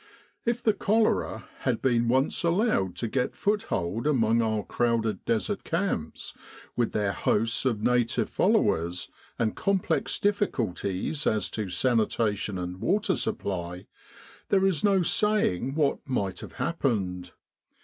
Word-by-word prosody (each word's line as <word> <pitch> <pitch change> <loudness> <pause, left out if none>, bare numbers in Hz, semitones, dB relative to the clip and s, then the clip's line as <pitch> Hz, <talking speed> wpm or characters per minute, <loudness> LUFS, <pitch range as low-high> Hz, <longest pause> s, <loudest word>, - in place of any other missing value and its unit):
If 240 +1 0
the 220 - +4
cholera 215 +2 +1
had 125 -4 0
been 120 -3 +2
once 130 +8 +1
allowed 170 - +1
to 120 - -2
get 125 +3 -1
foothold 120 - -1
among 115 -5 +3
our 110 -2 0
crowded 115 -4 0
Desert 115 - -1
camps, 165 - -2 0.4
with 120 -2 +1
their 105 -2 +1
hosts 115 +3 +1
of 110 -5 0
native 120 -1 +2
followers, 85 +2 +1 0.3
and 110 -2 0
complex 195 -2 0
difficulties 140 - -1
as 110 - 0
to 105 -3 -3
sanitation 110 -3 0
and 90 +1 -5
water 200 - +1
supply, 90 - -3 0.6
there 195 -1 +3
is 190 -4 +1
no 195 -3 +4
saying 150 - +1
what 150 -3 +1
might 100 -7 -1
have - - -9
happened. 95 - -2
115 Hz, 130 wpm, -27 LUFS, -, 0.6 s, the